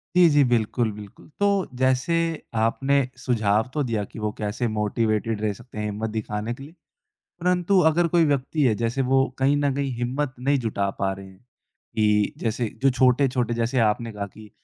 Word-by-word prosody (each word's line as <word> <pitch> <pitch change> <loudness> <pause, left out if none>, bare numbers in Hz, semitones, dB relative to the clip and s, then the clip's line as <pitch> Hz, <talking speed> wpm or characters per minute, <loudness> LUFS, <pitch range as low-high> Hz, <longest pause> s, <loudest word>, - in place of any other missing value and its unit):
जी, 180 -2 +7
जी, 145 -1 +5
बिल्कुल, 115 0 +1
बिल्कुल, 105 -1 -12
तो 205 - +3 0.3
जैसे 130 +5 +2 0.4
आपने 125 +5 +2 0.2
सुझाव 110 -2 +1
तो 150 - 0
दिया 115 -5 -1
कि - - -9
वो 105 0 -1
कैसे 105 +3 -2
मोटिवेटेड 110 0 -1
रह 105 -1 0
सकते 120 +1 -14
हैं 105 - -2
हिम्मत 105 +1 -3
दिखाने 110 +1 -3
के 135 - -10
लिए, 145 - -11 0.7
परंतु 180 +2 +2
अगर 170 +2 +2
कोई 170 0 +3
व्यक्ति 145 +1 0
है 120 -5 +3
जैसे 115 +4 0
वो 135 0 +4 0.2
कहीं 140 +2 +3
न 145 -1 +1
कहीं 140 -1 -1
हिम्मत 130 +3 -2
नहीं 140 +3 +2
जुटा 100 -3 0
पा 95 0 +1
रहे 95 0 -10
हैं 95 -1 -16 0.6
कि 105 -1 +2
जैसे 115 0 -2
जो 135 - +6
छोटे-छोटे 125 -2 +2
जैसे 120 +2 0
आपने 115 +2 -3
कहा 100 -1 -5
कि 110 -1 -12
120 Hz, 185 wpm, -24 LUFS, 105-135 Hz, 0.7 s, जी